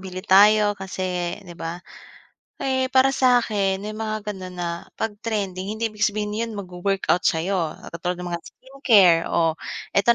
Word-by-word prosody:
bili 185 0 -7
tayo 210 +1 +6
kasi, 185 -3 -3
'di 175 - -10
ba? 165 0 -5 0.9
Eh, 260 -1 +1
para 265 +1 +6
sakin 215 -7 +2
may 210 - -4
mga, 215 -1 -4
ganon, 185 -2 -8
na 175 -1 -2 0.3
pag 225 - -2
trending 200 -3 -3
hindi 225 0 -2
ibig 215 0 +1
sabihin 210 0 -2
yun 230 0 -2
magwo-workout 190 -1 -1
sayo, 170 0 0 0.2
katulad 175 +2 -3
ng 175 - -5
mga 170 -1 -3
skincare, 225 -11 +4
o 165 -1 +1 0.3
eto 220 +4 +4
200 Hz, 155 wpm, -23 LUFS, 180-215 Hz, 0.9 s, tayo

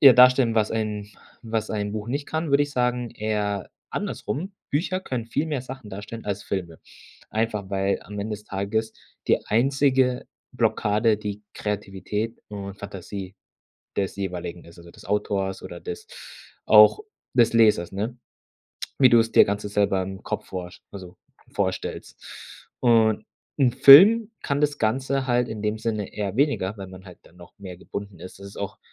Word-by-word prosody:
eher 135 -3 +10
darstellen, 125 -2 +6
was 110 -1 +2
ein 105 -2 -3 0.3
was 110 -1 -2
ein 105 -1 -2
Buch 110 +1 -5
nicht 140 +3 -2
kann, 160 -1 -2
würde 140 +1 +5
ich 145 - -3
sagen, 125 -1 0
eher 105 -3 -2 0.2
andersrum, 165 - -4 0.2
Bücher 185 +6 0
können 125 -9 -4
viel 145 +7 -1
mehr 145 -5 -2
Sachen 130 -3 -9
darstellen 105 +4 -8
als 100 0 -2
Filme. 85 -4 -4 0.5
Einfach, 105 -3 -2
weil 95 0 0
am 105 0 -9
Ende 105 +2 -3
des 105 - -11
Tages 105 +3 -2 0.4
die - - +3
einzige 130 +2 +2 0.3
Blockade 110 -2 +2
die 105 0 -6
Kreativität 105 +2 -4
und 100 -1 -7
Fantasie 100 -1 -7 0.6
des 95 -1 -1
jeweiligen 90 -3 -5
ist, 85 - -15
also 85 0 -14
des - - -16
Autors 100 -1 -1
oder - - -8
des 440 0 -7 0.6
auch 425 - +7 0.3
des 120 -2 +4
Lesers, 105 -7 +4
ne? 110 +6 -4 0.8
Wie 130 -2 +7
du's 115 -1 +4
dir - - +8
ganze 105 +1 -3
selber 100 -2 +1
im 95 +1 -7
Kopf - - -4
vorst 90 -1 -7
also 90 -3 -10 0.3
vorstellst 95 -2 -3 0.6
und 110 -3 +3 0.3
'n 130 -3 +4
Film 205 - +9
kann 140 0 -1
das 145 -1 +1
Ganze 130 +4 0
halt 125 -1 +2
in 110 - -5
dem 105 0 0
Sinne 110 -3 -3
eher 100 0 -3
weniger, 130 -8 +1
weil 95 - -6
man 95 0 -12
halt 90 -2 -13
dann 85 - -21
noch 85 -1 -14
mehr 95 -3 -9
gebunden 100 0 -8
ist. 90 +2 -11
Es 100 - -9
ist 100 - -14
auch 100 -1 -5
105 Hz, 165 wpm, -24 LUFS, 100-125 Hz, 0.8 s, eher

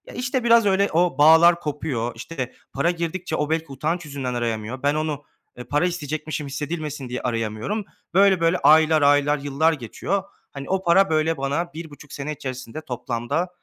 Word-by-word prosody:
işte, 250 +1 -1
biraz 235 -1 +5
öyle 200 0 +3
o 170 -3 +2
bağlar 160 +3 +7
kopuyor. 145 -7 -3
İşte, 130 +2 -6 0.2
para 140 +6 +1
girdikçe 170 +1 -3
o, 150 0 -1
belki, 160 0 0
utanç 160 +5 -2
yüzünden 140 -4 -4
arayamıyor. 120 +1 -3
Ben, 145 +1 +2
onu 155 -2 -2 0.5
para 145 +4 +2
isteyecekmişim, 155 -3 -3
hissedilmesin 150 -1 -5
diye 125 - -4
arayamıyorum. 115 - -2 0.3
Böyle, 195 0 +5
böyle, 165 +2 +3
aylar, 155 -1 +5
aylar, 145 +1 +4
yıllar 145 +3 +1
geçiyor. 160 - -3 0.3
Hani, 140 -1 -8
o 190 0 0
para, 190 +3 +4
böyle, 160 0 +1
bana 145 +6 -2
1,5 150 -3 -10
sene 145 +2 -4
içerisinde 130 0 -7
toplamda 125 +7 -3
155 Hz, 160 wpm, -23 LUFS, 135-170 Hz, 0.5 s, bağlar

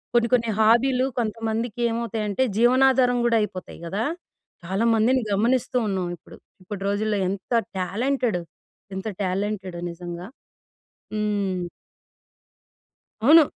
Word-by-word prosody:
కొన్ని 235 -1 +4
కొన్ని 235 -2 +3
హాబీలు 250 +4 +4
కొంతమందికి 225 +1 -2
ఏమవుతాయి 230 -1 -2
అంటే 205 +6 +1
జీవనాధారం 250 +1 +4
కూడా 230 -1 +4
అయిపోతాయి 185 -3 -5
గదా! 200 +7 -2 0.6
చాలా 190 +6 0
మందిని 245 +4 +3
గమనిస్తూ 240 +5 +1
ఉన్నాం 190 -3 -1
ఇప్పుడు. - - -15 0.3
ఇప్పటి 195 +1 -6
రోజుల్లో 210 0 0
ఎంత 195 +4 -4 0.3
టాలెంటెడ్ 230 +2 0 0.6
ఎంత 190 +3 -4
టాలెంటెడ్. 190 -1 -2
నిజంగా 175 0 -7 0.9
హ్మ్. 200 -4 -1 1.6
అవును. 305 +5 +8
220 Hz, 105 wpm, -24 LUFS, 195-240 Hz, 1.6 s, అవును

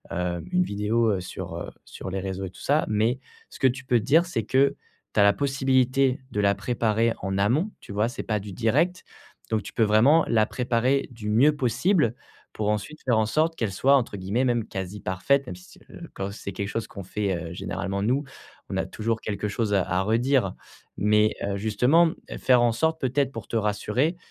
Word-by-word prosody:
heu, 90 0 -2
une 180 0 +4
vidéo, 110 - +1
heu, 95 - 0
sur, 95 - -7
heu - - -5
sur - - -8
les 95 0 -3
réseaux 95 0 -4
et 95 - -6
tout 90 - -15
ça, 150 +3 +2
mais 110 +4 +1 0.3
ce - - -13
que 135 - +5
tu 130 +1 -2
peux 125 -2 +2
te 105 - -6
dire, 160 +6 +4
c'est 140 -10 -2
que 135 +6 +2 0.4
tu - - +1
as 100 - +7
la 100 0 +6
possibilité 135 0 +1
de 105 - -2
la 100 -1 +3
préparer 115 +1 0
en 95 0 -2
amont, 125 - +2
tu - - -11
vois, 105 +3 +1
c'est 125 - -5
pas 105 -2 -1
du 100 0 -8
direct. 165 - +1 0.5
Donc 110 -1 0
tu - - -10
peux 115 - +2
vraiment 120 +10 +5
la 110 -2 +4
préparer 125 +4 0
du 110 -3 -6
mieux 130 +8 +5
possible, 130 - +1 0.4
pour 105 -1 -1
ensuite 105 +9 -3
faire 120 -4 +2
en 110 - +3
sorte 155 +8 +1
qu'elle 115 -9 -2
soit 135 +8 +4
entre 120 -6 0
guillemets 100 +6 -1
même 120 -3 0
«quasi 95 +2 -5
parfaite», 95 +11 +1
même - - -6
si, 90 +1 -16
c'est - - -32 0.3
quand 100 0 -4
c'est 100 -1 -7
quelque 100 +1 -4
chose 115 +2 -3
qu'on 100 - -9
fait, 100 +1 -2
heu, 85 -1 -6
généralement 95 +3 -3
nous, 130 +7 +1 0.4
on - - -3
a - - 0
toujours 110 0 -2
quelque 105 0 -3
chose 105 0 -1
à 100 - +4
à 90 +1 +1
redire. 115 -1 +2 0.4
Mais, 105 +1 +3
heu, 100 0 -2
justement, 125 +11 +3 0.2
mmh, - - -6
faire 125 -2 +4
en 120 -1 +4
sorte 160 +7 0
peut-être 135 +1 +1
pour - - -8
te - - -5
rassurer, 115 - 0
110 Hz, 215 wpm, -25 LUFS, 100-130 Hz, 0.5 s, as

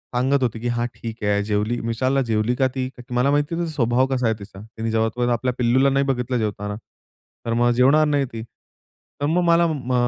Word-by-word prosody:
सांगत 130 +2 +2
होती, 115 -2 -1
की 120 - -3
हा 120 0 0
ठीक 115 -1 -8
आहे 105 0 +1
जेवली. 105 +3 -1
विचारल 130 +4 +1
जेवली 110 +1 0
का 130 +1 +2
ती? 130 -1 -2 0.2
मला 125 +3 +2
माहिती 155 +4 0
स्वभाव 130 -4 +1
कसा 125 -2 0
आहे 110 - +1
तिचा. 100 -1 -11 0.2
ति 115 0 -2
जेव्हापर्यंत 115 +2 0
आपल्या 125 +2 0
पिल्लूला 130 +3 +3
नाही 140 +1 +1
बघितलं 125 -2 -1
जेवताना 105 -2 -3 0.7
तर 115 - -1
मग 120 +1 +3
जेवणार 135 +6 +4
नाही 145 -2 +1
ती. 115 - -5 0.8
तर - - +1
मग 165 +4 +2
मला 170 0 +4
म 135 -6 -3
125 Hz, 195 wpm, -22 LUFS, 115-135 Hz, 0.8 s, जेवणार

